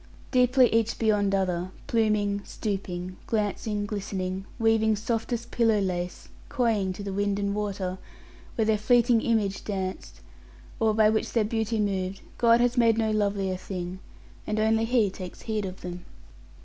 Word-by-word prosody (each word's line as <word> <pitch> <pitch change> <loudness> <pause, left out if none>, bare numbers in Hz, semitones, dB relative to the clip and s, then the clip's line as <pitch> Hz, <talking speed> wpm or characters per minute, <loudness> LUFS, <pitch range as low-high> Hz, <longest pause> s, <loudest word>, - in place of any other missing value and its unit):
Deeply 255 0 +5
each 225 0 +1
beyond 205 -3 +2
other, 180 -2 -1 0.2
pluming, 210 -3 +1
stooping, 185 -4 -4
glancing, 210 -1 -1
glistening, 195 -2 -3
weaving 225 -1 +3
softest 225 +2 -3
pillow 225 -3 +3
lace, 180 -2 -3 0.2
coying 225 -8 +1
to 195 +2 -7
the 200 -1 -4
wind 200 0 0
and 200 0 -1
water, 195 -3 -3 0.6
when 225 - +1
their 215 -1 +2
fleeting 235 +1 +4
image 210 -4 0
danced, 190 -2 -4 0.6
or 220 -1 +2
by 215 -1 +5
which 220 0 0
their 225 -3 +2
beauty 225 0 -1
moved, 195 -2 -1 0.2
God 235 -1 +5
has 245 +1 +2
made 230 -2 +4
no 220 -1 +1
lovelier 200 -3 0
thing; 180 -1 -5 0.5
and 215 - -1
only 220 +1 +3
He 225 -4 +2
takes 185 -2 -9
heed 215 -3 -2
of 185 0 -7
them. 175 0 -6
210 Hz, 150 wpm, -27 LUFS, 195-225 Hz, 0.6 s, Deeply